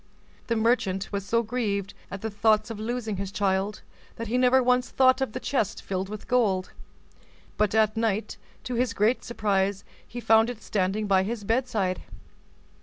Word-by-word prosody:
The 230 - +1
merchant 220 -4 +1
was 200 -1 -2
so 230 0 +2
grieved 210 -4 -2 0.2
at 195 - -7
the 220 - -3
thoughts 215 +1 +2
of 215 - -6
losing 220 -2 -3
his 195 0 -4
child, 195 0 -1 0.3
that 230 - -5
he 240 - -1
never 255 +1 +4
once 250 0 +2
thought 260 0 +4
of 265 -5 -1
the 255 - -3
chest 255 -7 -1
filled 190 0 -3
with 215 0 -8
gold, 205 -7 +1 0.8
but 210 0 +1
at 215 0 +3
night, 220 -1 -1 0.3
to 250 - -4
his 240 0 0
great 225 +3 +1
surprise, 200 -3 0 0.2
he 240 - -7
found 225 0 +4
it 230 -3 -7
standing 200 +1 -1
by 195 -2 +3
his 215 +2 -3
bedside. 220 -5 0
215 Hz, 175 wpm, -26 LUFS, 200-235 Hz, 0.8 s, never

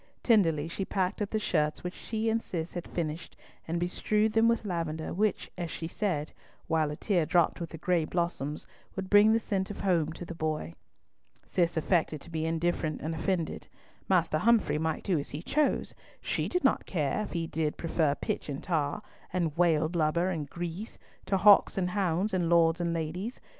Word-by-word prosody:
Tenderly 165 - +3
she 180 +4 -3
packed 190 +1 -1
up 205 - -1
the 220 - 0
shirts 155 -7 0
which 180 0 -4
she 220 0 -3
and 225 0 +2
Cis 165 -5 -4
had 175 - -5
finished, 165 -1 -4 0.3
and 170 +1 -1
bestrewed 210 +5 +1
them 225 +1 +4
with 230 -1 +1
lavender, 165 -4 -3
which, 210 +2 0
as 170 -1 -3
she 165 - -5
said, 170 -4 -2 0.3
while 160 -2 +1
a 150 - -4
tear 180 0 +1
dropped 170 +3 +2
with 170 - -4
the 160 - -8
gray 170 0 +1
blossoms, 155 -4 -2 0.3
would 190 -1 -5
bring 205 +1 +7
the 225 - +4
scent 195 -4 -2
of 205 - -6
home 170 -5 +2
to 175 - -8
the 170 - -6
boy. 155 - -3 0.7
Cis 170 -2 0
affected 160 -2 +1
to 170 - -12
be 160 0 -1
indifferent 165 -1 -1
and 160 +2 -3
offended. 170 0 -2 0.4
Master 170 -4 +3
Humfrey 230 -8 +3
might 160 0 -1
do 180 -6 +1
as 140 - -5
he 150 +3 -6
chose. 300 +7 +1 0.3
She - - -2
did 360 -2 0
not 270 - +2
care 150 0 0
if 210 - -5
he 170 -2 -1
did 160 -1 -2
prefer 160 -3 +1
pitch - - -3
and 140 -1 -5
tar, 160 +2 -1 0.3
and 170 -4 -1
whale 165 -3 +3
blubber 170 +2 +1
and 155 -5 -4
grease, 175 +6 -5 0.3
to 195 - +2
hawks 200 +1 +6
and 180 -1 0
hounds, 190 +1 0
and 175 -3 +1
lords 170 0 +4
and 170 -1 0
ladies. 170 +8 -3
170 Hz, 195 wpm, -29 LUFS, 160-195 Hz, 0.7 s, bring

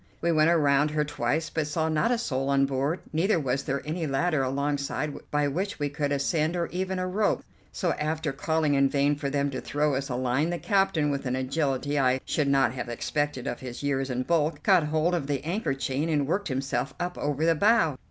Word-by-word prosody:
We 170 - +1
went 155 0 +4
around 145 -3 +3
her 150 0 0
twice, 145 +3 -1
but 155 -2 -1
saw 160 +2 0
not 160 +8 +1
a 245 - +2
soul 135 - -2
on 140 0 +4
board, 140 +5 -1
neither 175 +4 +2
was 135 -2 -1
there 135 0 -3
any 160 +1 -2
ladder 150 +2 +1
alongside 140 +2 -1 0.2
by 145 0 +1
which 185 +8 -2
we 145 -1 -1
could 145 0 -2
ascend, 155 +4 0
or 170 -1 0
even 185 +1 -2
a 185 - -1
rope; 205 +3 0 0.3
so, 175 -3 -1
after 155 0 -2
calling 155 +1 0
in 140 -1 +4
vain 145 +1 +2
for 145 -1 -3
them 140 0 0
to 130 - -4
throw 150 0 0
us 135 +1 -2
a 125 - -2
line, 130 +5 0
the 175 - -1
captain, 195 -7 +1
with 140 -1 -3
an 125 - 0
agility 140 +1 -1
I 130 -1 +3
should 150 -3 0
not 135 -3 +3
have 125 -2 -5
expected 145 +2 -2
of 120 - -3
his 125 +1 -7
years 135 -1 0
and 125 0 -2
bulk, 165 -2 0
caught 185 -6 +4
hold 155 +3 +1
of 165 -6 -1
the 140 -1 -2
anchor 165 -5 -1
chain 135 +3 -2
and 145 -3 +1
worked 190 +8 -1
himself 135 -1 -2
up 180 0 -2
over 145 +2 0
the 165 - +5
bow. 200 - +3
145 Hz, 220 wpm, -27 LUFS, 135-165 Hz, 0.3 s, the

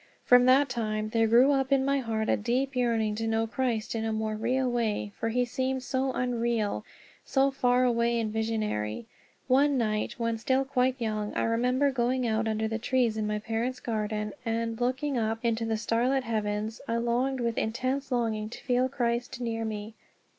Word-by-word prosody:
From 245 0 +6
that 265 +2 +5
time 215 -3 -2
there 225 0 +2
grew 245 +5 +6
up 270 -1 +1
in 270 -1 +3
my 275 0 +2
heart 220 -3 -2
a - - +3
deep 255 +5 -1
yearning 230 -4 +1
to 225 0 -2
know 225 0 +1
Christ 230 -1 -2
in 225 -1 -2
a 225 - -1
more 220 0 -1
real 250 +4 0
way, 225 -4 -1
for 225 - -2
he 245 +2 +1
seemed 260 +1 -2
so 260 +1 -1
unreal, 235 -4 -1 0.4
so 275 0 +2
far 250 -1 +2
away 235 -1 +2
and 215 -2 -2
visionary. 220 - -2 0.4
One 275 +2 +4
night 215 -3 -1
when 230 -1 -1
still 260 +3 +1
quite 260 -1 +1
young 215 -2 -2
I - - 0
remember 250 +5 +2
going 255 0 0
out 225 0 0
under 220 0 0
the 225 +1 -3
trees 240 -1 +1
in 215 -1 -1
my 210 0 -1
parents' 230 +4 -2
garden 215 -2 -2
and, 230 0 -2
looking 260 +2 0
up 220 0 0
into 230 0 +1
the 225 -1 0
starlit 245 +4 +1
heavens, 215 -1 -2
I 230 - 0
longed 245 +3 0
with 235 -1 -1
intense 255 +5 -2
longing 220 -3 -1
to - - -10
feel 250 +1 +1
Christ 240 -1 -2
near 230 -2 -2
me. 215 0 -5
235 Hz, 190 wpm, -28 LUFS, 220-255 Hz, 0.4 s, From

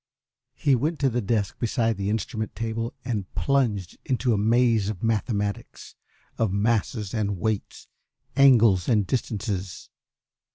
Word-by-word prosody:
He 140 - +2
went 155 +7 -1
to 135 -2 +3
the 120 +1 0
desk 100 -2 -1
beside 115 -1 0
the 100 +1 -3
instrument 110 0 -3
table 115 +2 -3
and 105 -6 -3
plunged 115 -10 0
into 125 -2 0
a - - +1
maze 115 -1 +3
of 105 -2 -6
mathematics, 105 -2 -2 0.5
of 110 -4 +1
masses 105 0 0
and 105 -3 -1
weights, 110 +3 -3 0.5
angles 115 -10 +5
and 105 -4 +3
distances. 100 -5 -3
110 Hz, 130 wpm, -25 LUFS, 100-120 Hz, 0.5 s, angles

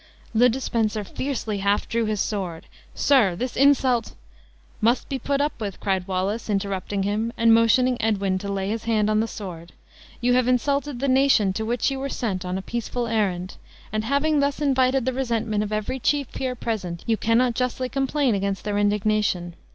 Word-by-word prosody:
Le 245 +3 +5
de 250 +3 -2
Spencer 220 -4 -1
fiercely 220 -2 -3
half 200 +1 +1
drew 230 0 0
his 215 -1 -1
sword; 185 -6 -3 0.3
"Sir, 240 -11 +3
this 245 +6 -4
insult 260 -4 +3 0.3
" - - -31
"Must 245 +2 +2
be 270 - -2
put 280 +1 0
up 290 -5 -2
with," 200 -3 -4
cried 190 -2 -1
Wallace, 195 +5 -2
interrupting 195 -1 -1
him, 215 +3 -1
and 230 -1 +5
motioning 235 +2 +3
Edwin 200 -4 0
to 200 +1 -4
lay 195 -1 -2
his 225 +1 -3
hand 215 -2 +2
on 215 - +2
the 225 - +1
sword; 175 -6 -8 0.5
"you 245 0 +2
have 250 -1 +3
insulted 275 +1 0
the 275 - +1
nation 260 -7 +4
to 220 +3 -3
which 240 +3 0
you 270 - -3
were 275 +1 -3
sent 195 -9 -2
on 180 +1 -3
a 190 - -5
peaceful 240 +2 -3
errand; 195 -5 -1 0.4
and 215 0 0
having 285 +5 +1
thus 280 0 0
invited 265 -3 +2
the 260 - 0
resentment 230 -4 -1
of 210 0 -3
every 215 +5 -2
chief 285 +1 0
here 255 -1 -3
present, 190 -8 -4
you 225 - +2
cannot 230 +3 +2
justly 255 +1 -1
complain 270 -1 0
against 195 -1 -2
their 205 -1 -1
indignation. 205 -4 +1
225 Hz, 190 wpm, -24 LUFS, 200-255 Hz, 0.5 s, Le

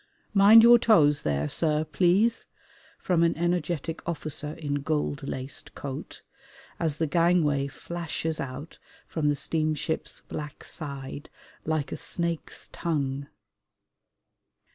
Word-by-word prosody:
"Mind 210 +3 +8
your 240 0 +8
toes 150 -11 +4
there, 75 -1 0
sir, 155 - +1
please," 185 +8 +2 0.5
from 175 -3 +1
an 170 -1 +2
energetic 170 -2 -1
officer 150 -2 -4
in 145 -3 -3
gold 145 -1 -1
laced 135 0 -6
coat, 135 -2 -7 0.6
as 155 -3 0
the 160 - +1
gangway 160 -3 +2
flashes 160 +2 -4
out 135 +4 -6 0.3
from 150 -3 -1
the 145 - +2
steamship's 155 +1 -2
black 150 -1 -7
side 140 -1 -7 0.4
like 155 -2 -1
a - - -3
snake's 170 -2 -4
tongue. 140 -4 -2
155 Hz, 115 wpm, -27 LUFS, 145-170 Hz, 0.6 s, Mind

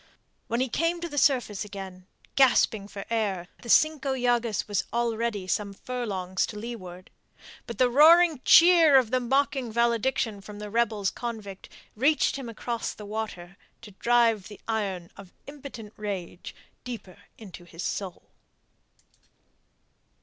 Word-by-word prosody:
When 235 +2 -1
he 260 - +1
came 335 +7 -1
to 340 - -3
the 290 -3 -2
surface 245 -9 +1
again, 190 -3 -9 0.3
gasping 225 -6 +3
for 200 -1 -8
air, 200 -6 -1
the 235 - -10
Cinco 295 -1 +3
Llagas 240 -3 0
was 200 -4 0
already 230 -3 -1
some 200 +2 -2
furlongs 195 -7 -3
to 210 - -8
leeward. 185 -5 -8 0.6
But 235 - -7
the 255 - +4
roaring 315 +3 +6
cheer 335 -4 +7
of 245 -4 +2
mocking 260 0 0
valediction 235 -2 0
from 210 +1 -11
the 210 0 -7
rebels 220 -4 0
convict 215 -5 -7 0.3
reached 285 +7 +2
him 270 -4 -6
across 230 +1 -4
the 210 - -10
water, 200 -4 -6 0.3
to 210 - -11
drive 230 -1 +2
the 210 - -12
iron 195 -6 -3
of 195 -2 -13
impotent 270 -7 -10
rage 195 -4 -6 0.3
deeper 230 -7 -8 0.2
into 190 -5 -11
his 170 0 -9
soul. 190 -3 -4
225 Hz, 135 wpm, -26 LUFS, 200-255 Hz, 0.6 s, cheer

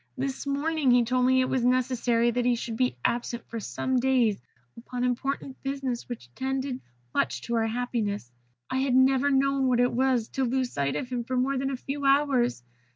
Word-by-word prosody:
This 270 +1 -3
morning 290 0 0
he 245 -1 +5
told 250 +1 +2
me 260 - +4
that 260 - +4
it 255 - 0
was 260 -2 0
necessary 245 -2 +2
that 245 +1 0
he 245 0 +3
should 230 -1 -4
be 250 - 0
absent 240 0 -1
for 230 - -5
some 255 +4 -1
days 245 - +2 0.3
upon 245 +1 -5
important 260 +2 -2
business 270 -3 -3
which 120 - -8
tended 265 - -3 0.3
much - - 0
to 235 - -4
our 225 -1 +2
happiness. 220 - -2 0.4
I 260 - -2
had 265 -1 +1
never 265 +2 +4
known 275 0 +2
what 250 -1 +2
it 245 0 +3
was 250 -2 +1
to 270 - -1
lose 255 0 0
sight 140 -1 -1
of 250 - -3
him 245 -2 -2
for 255 +2 -2
more 265 +2 +1
than 270 +1 -1
a 270 - -3
few 280 +3 -5
hours. 275 - +2
255 Hz, 205 wpm, -27 LUFS, 240-265 Hz, 0.4 s, he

